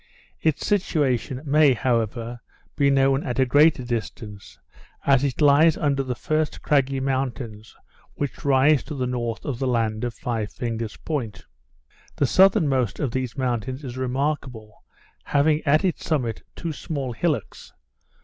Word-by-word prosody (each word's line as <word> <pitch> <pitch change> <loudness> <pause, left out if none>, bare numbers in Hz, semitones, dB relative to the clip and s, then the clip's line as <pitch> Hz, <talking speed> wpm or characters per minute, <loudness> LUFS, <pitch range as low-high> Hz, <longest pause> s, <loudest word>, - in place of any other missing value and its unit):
Its 155 -3 0
situation 140 - 0
may, 145 -2 +4
however, 120 0 -1 0.4
be 140 -1 +3
known 135 0 +3
at 125 - -3
a 130 - +4
greater 145 +1 +4
distance, 110 -4 -6 0.5
as 135 -1 +4
it 140 -3 -1
lies 150 +2 +5
under 140 -2 +1
the 130 -2 -3
first 155 +4 -2
craggy 135 -2 +2
mountains 125 -5 -3 0.4
which 145 -2 -4
rise 140 +1 +4
to 150 - -7
the 130 -2 -1
north 120 -2 -3
of 130 -5 -3
the 135 - -1
land 115 -3 0
of 120 -2 -3
Five 110 -4 -3
Fingers 115 -2 -4
Point. 115 - -4 0.7
The 145 - +2
southernmost 140 - +3
of 140 -5 -1
these 130 +1 -3
mountains 130 +1 -2
is 125 -3 -6
remarkable, 130 -4 -3 0.4
having 150 +2 +2
at 155 +6 +4
its 180 - -1
summit 125 -8 -1
two 165 -2 -4
small 140 -4 -4
hillocks. 115 - -3
130 Hz, 145 wpm, -24 LUFS, 120-145 Hz, 0.7 s, lies